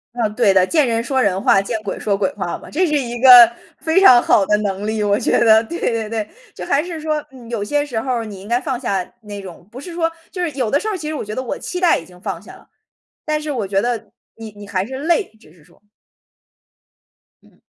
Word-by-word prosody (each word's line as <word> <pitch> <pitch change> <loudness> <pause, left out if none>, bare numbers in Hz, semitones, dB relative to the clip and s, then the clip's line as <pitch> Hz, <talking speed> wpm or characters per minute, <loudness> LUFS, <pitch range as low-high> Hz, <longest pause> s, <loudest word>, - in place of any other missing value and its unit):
嗯， 225 -3 -1
对 195 - +3
的， 190 -1 +5
“见 300 -6 +2
人 230 0 0
说 265 +2 -1
人 195 -4 +1
话， 195 - +4
见 215 +2 -3
鬼 205 - -5
说 205 - 0
鬼 195 -1 -1
话 180 -4 -3
“嘛， - - -12
这 360 +5 +1
是 300 -2 0
一 240 -4 -2
个 245 -3 +9 0.3
非 320 +4 +2
常 250 -11 +7
好 195 - +3
的 210 - +2
能 200 -1 -3
力， 220 0 -2
我 205 0 +1
觉 - - +1
得， 220 -1 +5
对 340 +9 -7
对 225 -2 -1
对。 220 -1 -3 0.3
就 - - -8
还 285 +2 +2
是 340 -3 -7
说 310 -1 -1
嗯， 245 -3 -13
有 230 -4 -3
些 290 +7 0
时 245 -6 -4
候 255 +3 -3
儿 230 - -3
你 205 -3 -9
应 195 - -12
该 240 +2 0
放 265 -5 -3
下 195 -8 -3
那 205 -2 -8
种 180 -1 -12
不 255 +3 -9
是 350 - -9
说 330 -1 -1 0.2
就 365 - -9
是 335 - -2
有 255 -5 -2
的 285 - +2
时 435 - -5
候 430 - -1
儿 - - -3
其 305 -2 -7
实 310 - -3
我 275 - -5
觉 210 - -6
得 260 - -3
我 255 - -5
期 360 - -5
待 355 -2 +3
已 165 - -9
经 180 0 -18
放 195 -5 -4
下 210 +7 -14
了， - - -19 0.6
但 305 0 -1
是 300 -1 -4
我 220 -8 -3
觉 195 0 +1
得 230 -2 -3 0.2
你 225 -1 -9
你 205 0 -10
还 190 -1 -2
是 265 +4 -7
累， 340 +4 +2
只 155 - -20
是 165 -3 -22
说。 - - -25 1.6
嗯。 - - -25
230 Hz, 285 characters per minute, -19 LUFS, 205-285 Hz, 1.6 s, 个